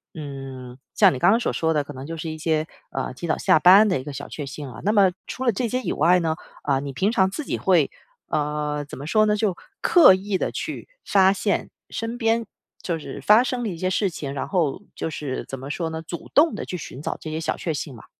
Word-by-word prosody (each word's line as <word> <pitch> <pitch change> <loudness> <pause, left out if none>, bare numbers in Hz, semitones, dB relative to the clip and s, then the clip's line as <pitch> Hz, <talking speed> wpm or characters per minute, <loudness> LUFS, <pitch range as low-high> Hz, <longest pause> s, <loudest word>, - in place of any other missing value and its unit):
嗯， 135 -4 -8 0.2
像 - - +6
你 130 - -4
刚 175 - +5
刚 225 - +4
所 240 - -1
说 160 0 +1
的， 150 -2 +1
可 145 - -9
能 130 +1 -8
就 165 - -5
是 160 0 -4
一 155 - -6
些， 155 0 0 0.3
呃， 135 -1 -3
提 170 +7 -6
早 155 - +1
下 - - +4
班 190 +7 +8
的 185 -7 +1
一 - - -7
个 145 - -7
小 140 +1 -6
确 145 - -5
幸 140 +1 -7
啊。 - - -10
那 210 - +2
么 195 -3 +5 0.2
除 260 - -5
了 245 - +4
这 235 +4 -1
些 250 +3 -1
以 - - -2
外 175 +4 +4
呢， 160 -1 0 0.3
啊， 135 -2 +1
你 140 0 -5
平 190 +9 +1
常 190 -4 +3
自 250 +11 -5
己 - - -2
会， 175 -7 +3 0.4
呃 150 0 -1
怎 - - -9
么 140 - -7
说 215 +7 +3
呢？ 210 - +3
就 205 -3 0 0.3
刻 340 - +7
意 195 +1 -2
地 - - -1
去 - - -5 0.2
发 190 -1 +5
现 200 +1 -1 0.2
身 230 +1 -4
边 230 -1 +1 0.4
就 170 -2 -2
是 155 - -8
发 215 +3 +6
生 255 -1 -2
的 - - -1
一 175 - -5
些 185 +2 -1
事 195 +1 +1
情， 145 -5 -6
然 140 - -3
后 175 -3 0
就 - - -3
是 145 -4 -4
怎 135 - -6
么 135 +2 -7
说 165 +2 -2
呢？ 160 0 -5
主 170 +1 -8
动 310 +3 +5
地 - - -4
去 180 - -5
寻 140 -4 -8
找 - - -3
这 155 - -7
些 155 - -3
小 - - -2
确 165 - -2
幸 145 -1 -5
吗？ 115 - -13
165 Hz, 280 characters per minute, -23 LUFS, 145-200 Hz, 0.4 s, 班